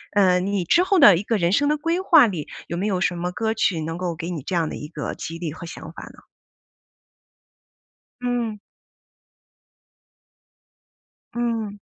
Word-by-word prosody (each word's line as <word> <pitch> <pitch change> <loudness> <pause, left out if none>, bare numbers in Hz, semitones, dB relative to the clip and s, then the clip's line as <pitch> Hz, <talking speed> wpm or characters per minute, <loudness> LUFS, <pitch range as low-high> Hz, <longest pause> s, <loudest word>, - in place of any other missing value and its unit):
呃， 185 -3 +4
你 195 0 -1
之 345 - +3
后 380 -1 +2
的 205 - +8
一 195 - -3
个 225 +1 0
人 170 -2 +1
生 285 +9 +2
的 300 - +1
规 330 +4 -1
划 335 -9 +6
里 175 -8 -4 0.2
有 170 - -4
没 195 +4 -1
有 185 -3 -1
什 180 -2 0
么 175 +1 -3
歌 220 +4 -1
曲 190 -6 0
能 165 +2 -4
够 180 -2 -3
给 165 +1 -6
你 170 -4 -4
这 185 - -3
样 165 -2 +1
的 - - -6
一 150 - -7
个 150 -1 -5
激 165 +1 -6
励 165 -2 -4
和 170 - -9
想 165 - -9
法 - - -10
呢？ - - -13 2.0
嗯。 240 -4 -2 2.7
嗯。 230 -4 -2
190 Hz, 185 characters per minute, -23 LUFS, 170-230 Hz, 2.7 s, 的